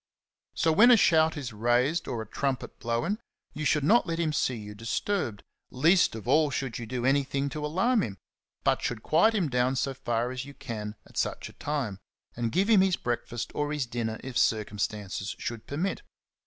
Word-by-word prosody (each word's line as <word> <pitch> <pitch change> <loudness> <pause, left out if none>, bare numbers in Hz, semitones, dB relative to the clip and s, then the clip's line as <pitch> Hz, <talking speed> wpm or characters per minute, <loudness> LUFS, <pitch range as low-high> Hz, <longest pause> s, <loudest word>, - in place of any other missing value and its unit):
So 165 - +2
when 220 +10 +7
a 245 - +8
shout 160 -5 +4
is 130 -5 -5
raised 120 +9 +1
or 115 -3 -3
a - - -15
trumpet 135 +3 -3
blown, 120 - -1 0.3
you 155 - -4
should 150 0 +2
not 225 +10 +4
let 165 -1 -1
him 160 -2 0
see 130 -3 +1
you 105 -2 -8
disturbed, 115 - -2 0.3
least 165 +3 +3
of 110 -3 -8
all 155 -1 +4
should 130 -3 -3
you 115 - -6
do 125 +1 -3
anything 140 +1 +1
to 150 +1 -5
alarm 190 +10 +2
him, 100 - -4 0.5
but - - +2
should 115 -3 -3
quiet 175 +9 +4
him 185 -6 +1
down 125 0 +1
so 135 +1 -1
far 120 -1 -1
as 130 0 -4
you 140 +1 -11
can 105 -2 -6
at - - -15
such - - -2
a - - -15
time, 135 -10 -3 0.4
and 115 -1 -1
give 190 +4 +2
him 215 -4 +6
his 190 -2 +3
breakfast 120 -1 -3
or 145 0 -1
his 150 -3 -1
dinner 115 -2 -3
if 130 -2 -2
circumstances 105 -2 -1
should 115 -2 -5
permit. 175 - -2
135 Hz, 195 wpm, -28 LUFS, 115-160 Hz, 0.5 s, a